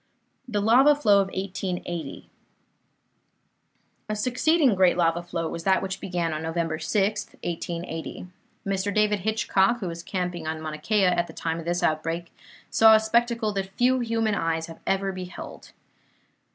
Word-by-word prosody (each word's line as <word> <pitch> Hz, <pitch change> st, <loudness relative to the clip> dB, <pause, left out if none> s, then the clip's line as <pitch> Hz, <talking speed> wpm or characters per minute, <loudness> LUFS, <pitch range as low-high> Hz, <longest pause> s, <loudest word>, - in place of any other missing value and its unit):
THE 210 Hz, -4 st, -1 dB
LAVA 255 Hz, +8 st, +6 dB
FLOW 205 Hz, -9 st, +4 dB
OF 195 Hz, -, -1 dB
1880 180 Hz, -5 st, -5 dB, 1.8 s
A 215 Hz, -, -1 dB
succeeding 255 Hz, +5 st, +2 dB
great 185 Hz, -2 st, +3 dB
lava 170 Hz, 0 st, +2 dB
flow 170 Hz, -1 st, -3 dB
was 165 Hz, +1 st, -6 dB
that 190 Hz, +1 st, +2 dB
which 190 Hz, 0 st, -4 dB
began 175 Hz, -3 st, -2 dB
on 155 Hz, -, -3 dB
November 165 Hz, 0 st, -2 dB
6, 195 Hz, +5 st, 0 dB, 0.2 s
1880. 170 Hz, 0 st, -5 dB, 0.4 s
Mr. 195 Hz, 0 st, -1 dB
David 210 Hz, 0 st, +2 dB
Hitchcock, 220 Hz, +2 st, +1 dB
who 190 Hz, -, -4 dB
was 170 Hz, 0 st, -5 dB
camping 175 Hz, -3 st, -4 dB
on 160 Hz, 0 st, -3 dB
Mauna 155 Hz, -1 st, -6 dB
Kea 205 Hz, +4 st, +2 dB
at 175 Hz, -1 st, +2 dB
the -, -, -11 dB
time 165 Hz, 0 st, -3 dB
of 165 Hz, -, -8 dB
this 175 Hz, +1 st, -1 dB
outbreak, 165 Hz, +2 st, -1 dB, 0.4 s
saw 220 Hz, 0 st, +7 dB
a -, -, +5 dB
spectacle 230 Hz, 0 st, +1 dB
that 195 Hz, -1 st, -3 dB
few 255 Hz, +1 st, +3 dB
human 225 Hz, -2 st, 0 dB
eyes 165 Hz, -3 st, -1 dB
have 165 Hz, 0 st, -11 dB
ever 195 Hz, 0 st, +1 dB
beheld. 185 Hz, -1 st, -9 dB
190 Hz, 155 wpm, -25 LUFS, 170-215 Hz, 1.8 s, saw